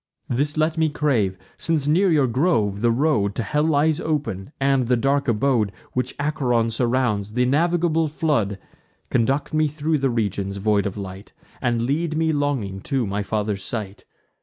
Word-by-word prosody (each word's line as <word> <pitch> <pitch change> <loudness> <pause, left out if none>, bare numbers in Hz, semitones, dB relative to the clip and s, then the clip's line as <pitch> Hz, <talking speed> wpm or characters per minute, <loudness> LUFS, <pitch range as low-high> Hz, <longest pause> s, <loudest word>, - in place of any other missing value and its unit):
This 145 +5 0
let 160 +1 +1
me 160 -1 +3
crave, 125 -11 0 0.2
since 155 -4 0
near 180 +6 +4
your 150 -5 +4
grove 115 - +1
the 120 - +3
road 115 -6 +1
To 115 - -1
hell 150 +5 0
lies 155 0 +2
open, 135 -9 -3
and 135 -2 +2
the 125 0 +3
dark 140 +3 +1
abode 115 -2 +2 0.2
Which 125 - -2
Acheron 125 -6 +1
surrounds, 115 -4 0
th' 125 +1 +2
innavigable 165 +3 +2
flood; 140 -11 0 0.5
Conduct 135 +6 +1
me 155 0 +3
thro' 155 +2 -1
the 135 -1 +1
regions 100 -4 -2
void 100 0 +1
of 100 - -6
light, 95 0 -8 0.3
And 120 -2 0
lead 155 +5 -1
me 160 0 +1
longing 135 -10 -1
to 130 -3 +1
my 100 +1 -2
father's 105 -1 -2
sight. 105 -2 -5
130 Hz, 165 wpm, -23 LUFS, 105-150 Hz, 0.5 s, near